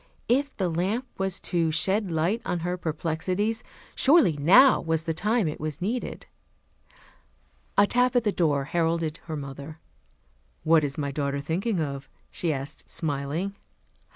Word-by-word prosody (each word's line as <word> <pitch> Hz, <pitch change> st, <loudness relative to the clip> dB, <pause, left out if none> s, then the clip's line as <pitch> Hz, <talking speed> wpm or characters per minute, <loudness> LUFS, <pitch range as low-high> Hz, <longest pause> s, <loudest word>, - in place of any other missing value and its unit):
If 280 Hz, +4 st, +1 dB
the 190 Hz, -, 0 dB
lamp 190 Hz, +9 st, -1 dB
was 190 Hz, -1 st, -1 dB
to 170 Hz, -2 st, +1 dB
shed 190 Hz, +6 st, +1 dB
light 170 Hz, +8 st, 0 dB
on 175 Hz, -, -2 dB
her 175 Hz, +1 st, -1 dB
perplexities, 180 Hz, +7 st, -2 dB, 0.3 s
surely 280 Hz, -, +5 dB
now 190 Hz, -, +6 dB
was 160 Hz, -1 st, -1 dB
the 165 Hz, 0 st, -1 dB
time 210 Hz, +3 st, +1 dB
it 150 Hz, -, -4 dB
was 155 Hz, 0 st, -4 dB
needed. 225 Hz, +7 st, -3 dB, 1.5 s
A 200 Hz, -, +7 dB
tap 250 Hz, +3 st, +2 dB
at 245 Hz, -, +4 dB
the 210 Hz, -, +1 dB
door 150 Hz, -7 st, +1 dB
heralded 165 Hz, +1 st, -1 dB
her 160 Hz, -2 st, -4 dB
mother. 140 Hz, +2 st, -8 dB, 0.9 s
"What 160 Hz, -1 st, +4 dB
is 140 Hz, -1 st, -2 dB
my 140 Hz, -2 st, -2 dB
daughter 140 Hz, 0 st, -2 dB
thinking 175 Hz, +8 st, -1 dB
of?" 140 Hz, -3 st, -4 dB, 0.2 s
she 170 Hz, -, -1 dB
asked, 140 Hz, -1 st, -6 dB
smiling. 155 Hz, +5 st, -2 dB
165 Hz, 150 wpm, -26 LUFS, 155-200 Hz, 1.5 s, A